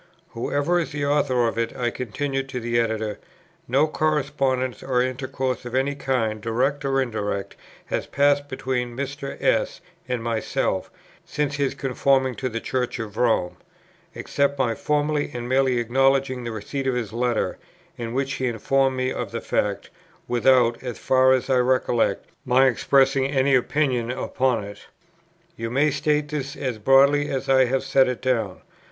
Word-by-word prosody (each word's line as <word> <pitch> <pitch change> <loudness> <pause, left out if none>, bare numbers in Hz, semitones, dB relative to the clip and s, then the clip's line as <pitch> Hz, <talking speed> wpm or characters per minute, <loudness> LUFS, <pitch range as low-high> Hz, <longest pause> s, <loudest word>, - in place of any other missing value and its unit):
"Whoever 145 +8 0
is 170 - -3
the 145 -1 -2
author 140 -4 +2
of 115 - -2
it," 115 +2 -2
I 120 -2 0
continued 135 +3 -3
to 130 -2 -4
the 120 0 0
Editor, 110 -2 -1 0.5
"no 135 +5 +3
correspondence 140 -5 0
or 130 -2 0
intercourse 130 0 -3
of 125 0 -6
any 135 +2 +1
kind, 115 -6 -1
direct 130 +6 0
or 135 -1 +1
indirect, 105 -6 -3 0.3
has - - -3
passed 145 0 +2
between 125 -2 -3
Mr. 140 0 -5
S. - - +1 0.3
and 125 -2 -2
myself, 115 -1 -1 0.3
since 145 -1 -2
his 140 -2 0
conforming 135 -1 +1
to 130 +2 -3
the 115 -1 -3
Church 125 +1 -2
of 110 -3 -6
Rome, 110 -7 +1 0.6
except 140 -1 0
my 125 -4 +1
formally 150 +3 0
and 120 0 -4
merely 130 0 +2
acknowledging 130 +2 +1
the 115 - -3
receipt 135 +5 -4
of 130 - +1
his 115 -4 -3
letter, 120 -1 -1 0.4
in 115 0 -5
which 135 0 -1
he 130 - -1
informed 130 +3 +1
me 130 0 0
of - - -4
the - - -3
fact, - - -2 0.4
without, 120 -1 +3
as 125 -3 -5
far 130 0 +3
as 130 -1 +2
I 130 -1 +3
recollect, 125 -2 +1 0.2
my 130 +2 +4
expressing 135 +1 +3
any 135 -1 +2
opinion 130 -2 +1
upon 125 -1 0
it. 100 0 -11 0.7
You 115 0 -4
may 140 +5 +2
state 150 +1 0
this 145 -2 -4
as 125 -5 -3
broadly 140 +5 +4
as 135 -1 -3
I 130 -1 +5
have 130 +2 0
set 135 0 +3
it 125 -2 -3
down." 115 -7 -1
130 Hz, 165 wpm, -23 LUFS, 120-140 Hz, 0.7 s, I